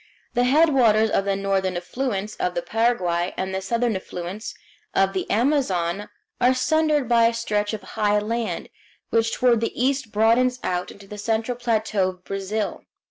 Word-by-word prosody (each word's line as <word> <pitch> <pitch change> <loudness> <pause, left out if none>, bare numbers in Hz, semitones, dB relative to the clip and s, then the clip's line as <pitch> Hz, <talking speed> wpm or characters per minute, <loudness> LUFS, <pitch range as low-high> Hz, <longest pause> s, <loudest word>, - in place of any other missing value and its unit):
The 245 0 +2
headwaters 250 -7 +4
of 195 - +1
the 200 -1 +1
northern 195 -2 0
affluents 210 +2 -3
of 180 - -1
the 175 - -1
Paraguay 185 -7 0
and 190 0 -2
the 190 - -2
southern 230 +3 0
affluents 185 +2 -6 0.4
of 195 0 +3
the 190 - -3
Amazon 205 - +1 0.3
are 255 +1 +4
sundered 305 0 +2
by 230 -1 +5
a 230 - -1
stretch 210 -3 -1
of 215 -3 -5
high 210 +1 0
land, 225 +2 -2 0.4
which 230 0 +2
toward 240 -3 +3
the 230 - -3
east 260 -2 0
broadens 235 +4 +3
out 180 0 -1
into 200 - -13
the 210 +1 -9
central 225 +3 -1
plateau 220 -5 0
of 180 -1 -11
Brazil. 195 +2 -3
220 Hz, 165 wpm, -23 LUFS, 195-240 Hz, 0.4 s, by